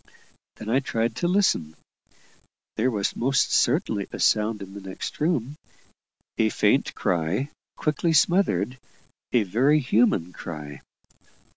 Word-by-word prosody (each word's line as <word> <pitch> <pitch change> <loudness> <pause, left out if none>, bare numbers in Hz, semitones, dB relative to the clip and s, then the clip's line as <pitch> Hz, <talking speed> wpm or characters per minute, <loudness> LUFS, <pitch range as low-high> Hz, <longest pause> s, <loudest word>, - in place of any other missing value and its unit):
Then - - -10
I 120 +4 +3
tried 115 -4 -1
to 175 - 0
listen. 175 - +1 1.0
There 120 +4 +1
was 105 -5 -1
most 135 +3 +1
certainly 110 - +1
a - - -7
sound 105 -1 +2
in 95 0 -11
the 100 - -8
next 95 -1 -7
room 150 -3 -1 0.8
a 110 -1 +4
faint - - +1
cry, 90 - -1 0.3
quickly 155 +2 0
smothered 140 - +2 0.5
a 120 -3 +3
very 125 +10 +3
human 110 - +2
cry. 75 -3 -8
115 Hz, 125 wpm, -25 LUFS, 95-140 Hz, 1.0 s, a